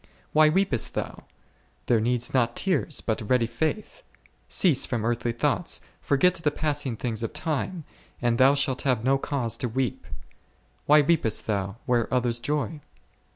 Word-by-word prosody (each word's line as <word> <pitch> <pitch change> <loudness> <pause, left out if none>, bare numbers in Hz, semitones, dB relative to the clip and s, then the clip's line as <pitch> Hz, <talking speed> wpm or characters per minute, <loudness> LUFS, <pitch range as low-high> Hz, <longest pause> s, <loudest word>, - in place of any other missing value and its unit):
Why 155 0 +6
weepest 160 - +1
thou? - - -5 0.6
there 115 -3 +2
needs 120 +1 0
not 120 -3 +1
tears, 180 -6 0
but 110 -2 -3
ready 125 -2 +3
faith; 160 - -3 0.5
cease 165 -8 +3
from 115 -3 -2
earthly 120 0 0
thoughts, 145 +8 -1 0.2
forget 155 +6 +3
the 165 -4 0
passing 145 -5 -2
things 115 -2 -3
of 115 - -4
time, 155 +2 -3 0.4
and 120 -1 0
thou 135 +2 +6
shalt 135 -2 0
have 125 -5 0
no 135 +2 +2
cause 130 -5 -1
to 125 - -3
weep. 125 -1 -3 0.8
Why 150 +1 +7
weepest 145 -8 +1
thou, 100 -2 -2
where 120 -2 0
others 120 -2 0
joy 150 +4 -2
130 Hz, 155 wpm, -26 LUFS, 115-150 Hz, 0.8 s, Why